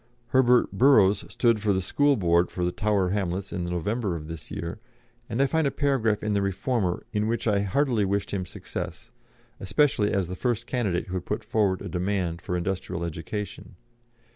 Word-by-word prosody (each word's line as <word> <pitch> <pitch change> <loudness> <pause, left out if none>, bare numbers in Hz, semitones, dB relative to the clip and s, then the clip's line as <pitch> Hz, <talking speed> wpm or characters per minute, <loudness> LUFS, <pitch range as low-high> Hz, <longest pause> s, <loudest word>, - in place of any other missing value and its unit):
Herbert 125 -1 +4
Burrows 105 -3 +5
stood 115 -3 +2
for 105 -1 +1
the 95 - +1
School 145 +8 +3
Board 85 -2 +3
for 90 - -2
the 90 - 0
Tower 100 -2 +1
Hamlets 95 -1 -2
in 90 -3 -2
the - - -4
November 95 +3 -1
of 75 -2 -7
this 80 0 -8
year, 85 +5 -5 0.5
and 115 +2 -2
I - - +4
find 155 +2 +1
a - - +3
paragraph 135 -7 +1
in 105 -1 0
the 100 - +2
Reformer 100 -1 -1
in 105 0 +1
which 115 +1 -1
I 105 -2 +3
heartily 110 +3 +1
wished 100 0 -1
him 95 -3 -2
success, - - -6 0.5
especially 110 0 +2
as 95 -3 0
the 90 - -5
first 120 +1 -1
candidate 105 -10 -1
who 90 - -8
had 90 -1 -3
put 105 +2 -2
forward 105 -4 +1
a - - -5
demand 90 -2 -1
for 90 0 -2
industrial 90 -1 -3
education. 85 +5 -6
100 Hz, 190 wpm, -26 LUFS, 90-115 Hz, 0.5 s, Burrows